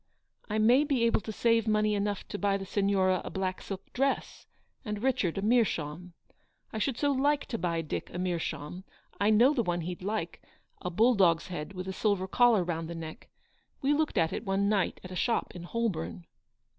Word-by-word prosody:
u 210 Hz, -, -2 dB
I -, -, +2 dB
may 240 Hz, +6 st, +5 dB
be 275 Hz, -5 st, +1 dB
able 230 Hz, -1 st, +3 dB
to 220 Hz, -, -6 dB
saye 230 Hz, +1 st, +3 dB
money 215 Hz, 0 st, +2 dB
enough 205 Hz, -1 st, -2 dB
to 205 Hz, -, -4 dB
buy 200 Hz, -1 st, +2 dB
the 195 Hz, -, -6 dB
Signora 195 Hz, -2 st, +2 dB
a -, -, -5 dB
black 185 Hz, -1 st, -3 dB
silk 195 Hz, -1 st, -8 dB
dress, 270 Hz, +2 st, -1 dB, 0.4 s
and 210 Hz, -2 st, -4 dB
Richard 220 Hz, -10 st, +1 dB
a 195 Hz, -, -2 dB
meerschaum. 180 Hz, -7 st, 0 dB, 0.6 s
I 220 Hz, -, -2 dB
should 250 Hz, +2 st, 0 dB
so 285 Hz, +1 st, +2 dB
like 285 Hz, +2 st, +2 dB
to 230 Hz, -, -3 dB
buy 170 Hz, -1 st, 0 dB
Dick 155 Hz, -, -4 dB
a -, -, -6 dB
meerschaum 175 Hz, -1 st, -3 dB
j -, -, -33 dB, 0.3 s
I 205 Hz, -, +3 dB
know 235 Hz, +7 st, +5 dB
the 250 Hz, -, +1 dB
one 175 Hz, -5 st, -1 dB
he'd 175 Hz, +2 st, -5 dB
like 195 Hz, -3 st, -3 dB, 0.2 s
— -, -, -40 dB
a 180 Hz, -, -2 dB
bull 225 Hz, +8 st, +4 dB
dog's 170 Hz, -6 st, +3 dB
head, 175 Hz, +1 st, -5 dB
with 185 Hz, 0 st, -6 dB
a 190 Hz, -, -3 dB
silver 200 Hz, -2 st, 0 dB
collar 235 Hz, -1 st, +4 dB
round 165 Hz, -1 st, -3 dB
the 170 Hz, -, -5 dB
neck. 160 Hz, +5 st, -8 dB, 0.5 s
We 280 Hz, +2 st, +3 dB
looked 300 Hz, -5 st, 0 dB
at 165 Hz, -2 st, +2 dB
it -, -, -3 dB
one 195 Hz, -1 st, +1 dB
night 205 Hz, -2 st, +1 dB
at 185 Hz, -, -9 dB
a -, -, -6 dB
shop 230 Hz, +5 st, 0 dB
in 175 Hz, -1 st, -8 dB
Holborn." 165 Hz, -, -3 dB
200 Hz, 215 wpm, -29 LUFS, 175-230 Hz, 0.6 s, may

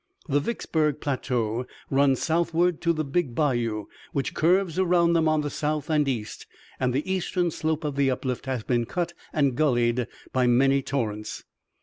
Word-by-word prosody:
The 145 Hz, -1 st, +2 dB
Vicksburg 150 Hz, -, -1 dB
plateau 125 Hz, -4 st, -1 dB, 0.2 s
runs 135 Hz, -1 st, +3 dB
southward 170 Hz, +1 st, +1 dB
to 170 Hz, -, +2 dB
the 155 Hz, -2 st, -1 dB
Big 140 Hz, -3 st, -1 dB
Bayou, 120 Hz, -8 st, 0 dB, 0.3 s
which 140 Hz, -, -1 dB
curves 180 Hz, +1 st, +2 dB
around 175 Hz, -2 st, +3 dB
them 165 Hz, -1 st, +3 dB
on 155 Hz, -1 st, +2 dB
the 145 Hz, -, -2 dB
south 150 Hz, +1 st, -2 dB
and 150 Hz, -2 st, +3 dB
east, 115 Hz, -6 st, -4 dB, 0.3 s
and 130 Hz, -1 st, +1 dB
the 140 Hz, +8 st, -1 dB
eastern 180 Hz, -2 st, 0 dB
slope 160 Hz, 0 st, -2 dB
of 145 Hz, -2 st, -2 dB
the 140 Hz, -1 st, +2 dB
uplift 130 Hz, 0 st, -3 dB
has 130 Hz, -4 st, -2 dB
been 120 Hz, -1 st, 0 dB
cut 170 Hz, +3 st, -2 dB, 0.2 s
and 140 Hz, -4 st, +1 dB
gulleyed 120 Hz, -4 st, +2 dB, 0.3 s
by 130 Hz, -1 st, +3 dB
many 135 Hz, +3 st, +4 dB
torrents. 110 Hz, -6 st, -3 dB
140 Hz, 165 wpm, -26 LUFS, 125-160 Hz, 0.3 s, many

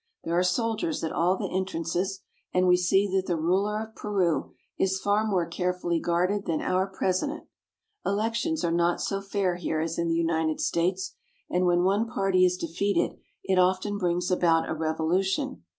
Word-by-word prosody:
There 165 Hz, -, -1 dB
are 175 Hz, -, +4 dB
soldiers 230 Hz, -, 0 dB
at 160 Hz, -, -1 dB
all 180 Hz, +3 st, +2 dB
the -, -, -4 dB
entrances, 185 Hz, +1 st, -2 dB, 0.3 s
and 185 Hz, 0 st, +2 dB
we 180 Hz, -, +6 dB
see 180 Hz, +2 st, +3 dB
that 190 Hz, 0 st, 0 dB
the 175 Hz, -, 0 dB
ruler 195 Hz, +6 st, +1 dB
of 220 Hz, 0 st, -12 dB
Peru 190 Hz, -6 st, -1 dB, 0.2 s
is 190 Hz, 0 st, +1 dB
far 205 Hz, +2 st, +2 dB
more 185 Hz, -5 st, +1 dB
carefully 175 Hz, 0 st, -1 dB
guarded 180 Hz, +5 st, 0 dB
than 160 Hz, -2 st, 0 dB
our 185 Hz, +1 st, 0 dB
president. 195 Hz, -, -1 dB, 0.6 s
Elections 230 Hz, +10 st, -1 dB
are 170 Hz, -, +1 dB
not 170 Hz, +1 st, +2 dB
so 195 Hz, -1 st, -2 dB
fair 195 Hz, -3 st, -1 dB
here 160 Hz, -3 st, -2 dB
as 165 Hz, +1 st, -2 dB
in 170 Hz, -, 0 dB
the 165 Hz, -, +1 dB
United 160 Hz, -1 st, 0 dB
States, 180 Hz, +3 st, 0 dB, 0.4 s
and 180 Hz, 0 st, +2 dB
when 175 Hz, 0 st, +3 dB
one 200 Hz, +5 st, +2 dB
party 195 Hz, -4 st, +2 dB
is 180 Hz, 0 st, +1 dB
defeat 185 Hz, +4 st, -1 dB
ed -, -, 0 dB, 0.2 s
it 190 Hz, -1 st, +2 dB
often 185 Hz, +3 st, +1 dB
brings 180 Hz, 0 st, 0 dB
about 165 Hz, -2 st, +3 dB
a -, -, -2 dB
revolution. 180 Hz, -, -1 dB
185 Hz, 180 wpm, -27 LUFS, 170-195 Hz, 0.6 s, we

